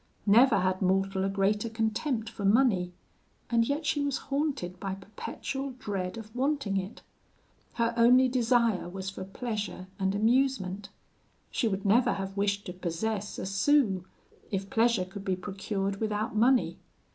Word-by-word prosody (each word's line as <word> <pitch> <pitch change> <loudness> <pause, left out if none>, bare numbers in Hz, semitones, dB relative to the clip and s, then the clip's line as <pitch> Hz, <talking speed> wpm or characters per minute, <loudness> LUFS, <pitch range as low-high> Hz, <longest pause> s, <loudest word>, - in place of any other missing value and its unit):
Never 225 0 +6
had 185 +1 0
mortal 190 +1 +1
a 195 - +1
greater 205 +3 +1
contempt 225 +2 -1
for 225 -2 -7
money, 200 -4 +3 0.6
and 230 -1 +3
yet 295 +3 -1
she 290 0 +1
was 280 -1 0
haunted 275 - -2
by 195 -1 -3
perpetual 255 +7 -6
dread 195 -4 -4
of 220 0 -10
wanting 270 -6 0
it. 195 +2 -5 0.7
Her 235 0 0
only 250 +3 +6
desire 235 -6 +2
was 190 +1 -5
for 190 - -7
pleasure 210 -2 -4
and 190 0 0
amusement. 215 -4 +1 0.6
She 235 - 0
would 195 -2 -2
never 240 +5 +4
have 195 0 -5
wished 200 0 0
to 180 - -6
possess 190 +4 -3
a - - -4
sou, 195 -1 +2 0.5
if 195 0 -3
pleasure 225 -4 +3
could 195 +2 -9
be 190 -1 0
procured 195 +1 -3
without 215 0 -2
money. 245 +3 +3
210 Hz, 150 wpm, -29 LUFS, 195-240 Hz, 0.7 s, Never